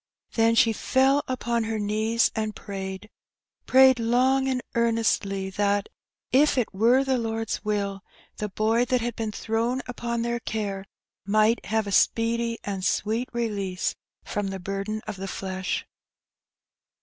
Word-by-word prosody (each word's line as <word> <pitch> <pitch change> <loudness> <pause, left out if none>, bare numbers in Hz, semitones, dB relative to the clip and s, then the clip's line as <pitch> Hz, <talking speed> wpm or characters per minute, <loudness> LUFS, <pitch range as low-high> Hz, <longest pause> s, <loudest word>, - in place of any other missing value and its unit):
Then 230 0 +3
she 225 0 +5
fell 270 +5 +2
upon 235 -3 -1
her 220 0 -2
knees 215 +2 +1
and 215 -1 -2
prayed 190 0 -6 0.6
^prayed 260 -1 +6
long 255 +3 +2
and 260 -1 0
earnestly 225 -4 +1
that, 200 +1 0 0.4
if 280 +2 +4
it 245 -5 0
were 235 +7 +4
the 265 -2 +1
Lord 225 -1 -3
s - - -2
will, 200 -2 -2 0.4
the 210 - -3
boy 220 +4 +2
that 250 -1 +1
had 235 0 -3
been 220 -1 -3
thrown 230 +4 -1
upon 235 -1 -3
their 235 0 -1
care 205 -4 -3 0.4
might 215 +3 +2
have 220 0 +1
a 200 - -4
speedy 230 +3 +2
and 195 -2 -4
sweet 220 +6 0
release 200 -6 -2 0.3
from 205 -1 -2
the 195 0 -4
burden 195 +3 -3
of 215 -2 -5
the 195 +1 -5
flesh. 190 -1 -3
225 Hz, 150 wpm, -26 LUFS, 200-235 Hz, 0.6 s, ^prayed